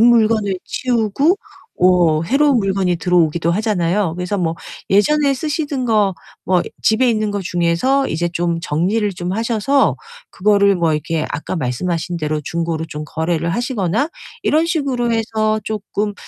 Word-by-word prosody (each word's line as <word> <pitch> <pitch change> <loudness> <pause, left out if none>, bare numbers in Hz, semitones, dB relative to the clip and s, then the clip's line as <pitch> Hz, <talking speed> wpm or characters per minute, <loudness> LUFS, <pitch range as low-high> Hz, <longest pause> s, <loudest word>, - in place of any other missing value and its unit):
물건을 220 -4 +3
치우고 255 - +1 0.4
워 175 -4 +3
해로운 275 - +3
물건이 190 -3 0
들어오기도 170 -2 +1
하잖아요. 185 -3 0
그래서 180 +3 -3
뭐 165 -3 0 0.4
예전에 280 +8 +3
쓰시던 290 -2 -2
거 210 -4 +2 0.3
뭐 180 -1 +2 0.2
집에 230 +4 +3
있는 215 -2 0
거 205 - -2
중에서 175 +11 +1
이제 170 +2 -1
좀 170 -1 -1
정리를 185 +7 0
좀 175 +1 -4
하셔서 230 +5 +1 0.3
그거를 200 0 +3
뭐 170 -2 +1
이렇게 155 +1 -1
아까 160 +5 -4
말씀하신 165 +6 -2
대로 155 -1 -2
중고로 165 0 -2
좀 150 -1 -6
거래를 165 +2 -1
하시거나 235 - -1 0.3
이런 315 +2 +2
식으로 275 -8 -1
해서 220 -1 0
쪼끔 210 -1 -3
200 Hz, 320 characters per minute, -18 LUFS, 170-230 Hz, 0.4 s, 물건을